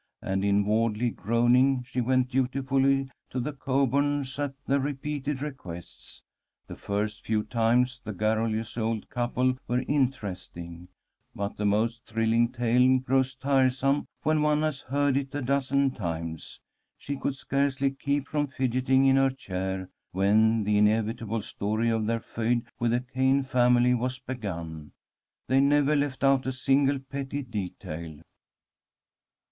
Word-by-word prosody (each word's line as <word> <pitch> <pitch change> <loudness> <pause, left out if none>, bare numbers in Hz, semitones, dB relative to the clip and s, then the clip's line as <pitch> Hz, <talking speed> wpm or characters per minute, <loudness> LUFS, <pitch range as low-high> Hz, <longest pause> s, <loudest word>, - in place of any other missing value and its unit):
And 95 0 -1
inwardly 105 +3 +1
groaning, 125 +5 +2
she 125 +1 -3
went 130 +1 +1
dutifully 135 +1 +1 0.2
to 130 - -3
the 145 +5 -3
Coburns' 140 0 0
at 140 -2 -2
their 140 +1 +2
repeated 145 0 -3
requests. 90 - -9 0.4
The - - -9
first 105 +1 -3
few 110 -1 0
times 125 +3 +1
the 110 - -5
garrulous 110 +2 -1
old 110 -1 -2
couple 125 +1 0
were 125 +1 0
interesting, 95 - -3 0.5
but 100 0 -3
the 105 - -1
most 115 +4 0
thrilling 115 +1 +2
tale 125 +1 +3
grows 130 0 0
tiresome 135 +1 +1 0.2
when 155 0 +2
one 150 0 +2
has 150 -4 -1
heard 140 0 +1
it 140 0 -3
a 145 - -1
dozen 140 +1 +1
times. 85 -6 -5 0.4
She 140 - -5
could 140 0 -2
scarcely 140 0 0
keep 140 +1 -2
from 150 -1 -1
fidgeting 130 0 +1
in 135 0 +5
her 135 0 +4
chair 95 -6 -4 0.3
when 110 +4 +3
the 105 0 +2
inevitable 110 +1 +1
story 110 +3 -1
of 110 -1 0
their 115 0 0
feud 115 +1 -1
with 120 - +1
the 120 +1 +1
Cayn 130 +2 +1
family 125 -1 +4
was 125 +1 -1
begun. 85 - -6 0.5
They 130 +1 +3
never 145 +1 +3
left 140 -2 -1
out 135 -1 +3
a - - +1
single 135 +2 +2
petty 140 +1 -5
detail. 85 - -6
125 Hz, 140 wpm, -27 LUFS, 110-135 Hz, 0.5 s, in